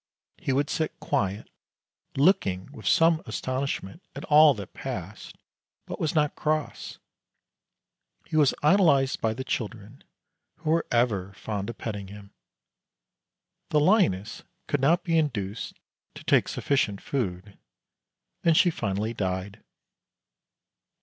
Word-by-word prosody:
He - - -2
would 140 +2 0
sit 155 -1 -2
quiet, 100 +1 -1 0.7
looking 135 - +2
with - - -8
some 165 0 +4
astonishment 130 - -3
at - - -6
all 150 -1 +7
that 100 -3 -9
passed, - - -7 0.5
but - - -7
was 160 -1 -1
not 150 -2 +2
cross. 155 0 -2 1.3
He - - -6
was 150 -3 +4
idolized 150 -6 +4
by 110 -1 0
the 130 - -4
children, 110 -4 -5 0.5
who 155 -1 -3
were 165 +1 +1
ever 105 -6 +1
fond 100 +1 -4
of 115 - -7
petting 105 -4 -5
him. 100 0 -12 1.4
The 150 - +3
lioness 145 - +2 0.2
could 145 - -1
not 165 +6 +3
be 165 -2 +2
induced 110 -9 -3 0.4
to - - -10
take - - +3
sufficient 105 -8 0
food, 100 -6 -4 0.8
and 165 -2 +4
she 175 - +5
finally 110 -3 -2
died. 95 -1 -3
130 Hz, 125 wpm, -26 LUFS, 100-155 Hz, 1.4 s, all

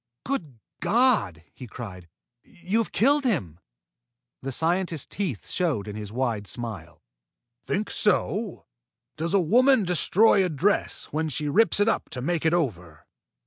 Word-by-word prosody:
"Good 165 - -3 0.2
God!" 210 - +2
he 125 - -10
cried. 95 -7 -9 0.3
"You 185 +6 -3
have 230 - -2
killed 285 +5 +3
him." 120 - -1 0.8
The 135 - -4
scientist's 165 +2 -1
teeth 180 - -4
showed 155 - -1
in 105 - -6
his 105 -1 -7
wide 115 -4 -2
smile. 100 -6 -6 0.6
"Think 205 +2 -2
so? 210 0 0 0.5
Does 165 +4 -1
a - - +5
woman 245 - +4
destroy 190 +4 +4
a 180 - 0
dress 175 +7 0
when 160 +1 -1
she 150 +1 -1
rips 215 +7 +3
it 205 - +3
up 225 - 0
to - - -3
make 165 +1 0
it 160 - +2
over?" 90 - -3
160 Hz, 145 wpm, -25 LUFS, -, 0.8 s, a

